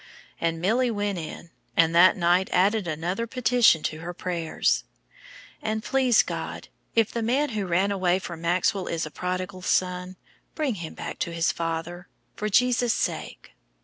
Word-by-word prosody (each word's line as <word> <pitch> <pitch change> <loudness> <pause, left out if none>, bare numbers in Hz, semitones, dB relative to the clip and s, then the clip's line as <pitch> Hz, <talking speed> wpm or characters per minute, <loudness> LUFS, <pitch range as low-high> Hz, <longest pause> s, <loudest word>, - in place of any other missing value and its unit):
And 165 -1 -1
Milly 235 +8 +2
went 205 -4 -2
in, 165 +1 -8 0.3
and 165 0 +4
that 175 +3 +6
night 180 +1 +2
added 200 +1 +2
another 175 +8 -2
petition 240 -8 +3
to 155 - -3
her 175 +2 -6
prayers: 170 -3 0 0.8
"And 215 0 -2
please 260 -4 +3
God, - - -6 0.3
if 225 -2 +3
the 235 - -2
man 265 +6 +1
who 210 -5 -3
ran 185 +4 +2
away 185 -2 +2
from 170 -3 -7
Maxwell 180 +2 +1
is 165 -1 -2
a 155 - -8
prodigal 185 +2 -4
son, 180 0 0 0.4
bring 300 -5 0
him 160 - -7
back - - -6
to 170 - -2
his 170 0 +1
father 165 +2 -4 0.3
for 210 - -2
Jesus' 245 +2 +3
sake. - - -4
185 Hz, 160 wpm, -25 LUFS, 170-220 Hz, 0.8 s, that